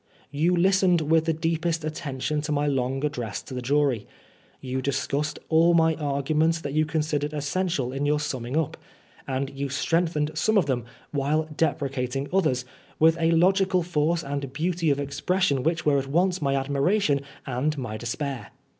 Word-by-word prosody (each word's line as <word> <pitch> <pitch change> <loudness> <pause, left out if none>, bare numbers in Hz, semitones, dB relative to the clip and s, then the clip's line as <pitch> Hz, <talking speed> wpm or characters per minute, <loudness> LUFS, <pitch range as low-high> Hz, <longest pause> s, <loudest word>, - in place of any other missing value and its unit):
You 160 +5 +2
listened 185 0 +4
with 160 +1 +2
the 165 - +2
deepest 165 0 -1
attention 150 -1 -3
to 150 +1 -4
my 145 0 +1
long 135 0 0
address 120 -8 -3
to 135 - -10
the 125 - -3
jury. 135 -4 +1 0.5
You 130 0 -3
discussed 140 +2 -1
aU 165 +2 +5
my 160 -1 +4
arguments 155 +2 0
that 140 -2 -4
you 155 0 +2
considered 150 -1 -1
essential 145 -3 -1
in 140 +2 -1
your 150 0 +2
summing 130 -2 -3
up; 160 0 -1 0.5
and 135 0 -2
you 140 0 -4
strengthened 155 +1 0
some 210 +8 +2
of 190 - +4
them, 125 -4 -1 0.3
while 150 +2 0
deprecating 135 -3 -1
others, 135 -10 +1 0.3
with 160 +1 +5
a 165 - +3
logical 185 +2 +3
force 165 0 0
and 140 -1 -4
beauty 165 +2 0
of 140 -1 +2
expression 140 +1 0
which 165 +3 0
were 145 -2 +4
at 135 - -5
once 180 +5 +1
my 140 -1 +1
admiration 140 +3 +1 0.2
and 135 +4 -1
my 120 -5 -4
despair. 120 +1 -4
150 Hz, 165 wpm, -25 LUFS, 135-165 Hz, 0.5 s, aU